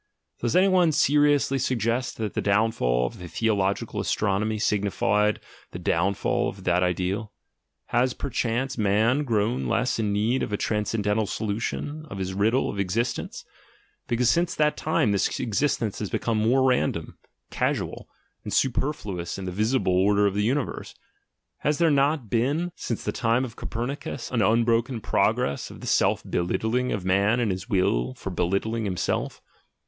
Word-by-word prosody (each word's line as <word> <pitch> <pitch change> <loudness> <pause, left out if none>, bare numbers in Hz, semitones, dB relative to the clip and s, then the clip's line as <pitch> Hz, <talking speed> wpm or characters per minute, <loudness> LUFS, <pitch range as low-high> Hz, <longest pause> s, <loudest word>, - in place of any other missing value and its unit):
Does 120 -1 -1
any 185 +2 +5
one 180 -4 +4
seriously 145 -2 +3
suggest 125 0 -1
that 110 -3 -3
the - - -1
downfall 100 - +2
of - - -6
the 90 - -8
theologi 100 -1 0
cal - - -4
astronomy 105 +1 0
signified 105 0 +1 0.3
the - - -4
downfall 95 +4 0
of 95 - -10
that 90 0 +2
ideal? 90 +4 -1 0.3
— - - -55
Has, 125 +1 +2
perchance, 125 -1 -2
man 110 +7 +2
grown 115 -1 0
less 125 0 0
in 105 -2 0
need 110 +6 +1
of - - -3
a 105 - 0
transcendental 105 0 0
so 110 - -3
lution 145 +8 -3
of 100 - -7
his 95 -1 -3
riddle 110 +7 +2
of 100 - -4
existence, 115 +6 -2 0.6
because 120 +1 +1
since 170 +6 +2
that 150 0 +2
time 155 -9 +1
this 100 - 0
existence 115 -2 -1
has 105 - -3
become 115 -2 -1
more 125 +5 +3
random, 125 -1 0 0.3
casual, - - -2 0.3
and - - -6
superflu 130 - -1
ous 85 - -5
in 95 - -6
the 90 - -3
visible 110 +1 +1
order 100 +3 +3
of 100 - +1
the 105 - 0
universe? 130 +5 -2 0.6
Has 150 0 0
there 170 -2 +3
not 140 -2 +2
been 140 - 0
since 115 - -4
the 105 - -1
time 115 +3 +1
of 115 -3 -9
Copernicus 125 +3 -5
an 120 -3 +1
unbroken 115 +3 +2
progress 70 -8 0
in - - -11
the - - -9
self - - +2
belittling 110 +8 0
of 95 -4 -3
man 100 +5 +2
and 115 -4 +1
his 95 +4 -5
will 65 - +1
for - - -6
belittling 105 +5 -1
him 90 -2 -3
self? - - -2
110 Hz, 165 wpm, -25 LUFS, 100-125 Hz, 0.6 s, any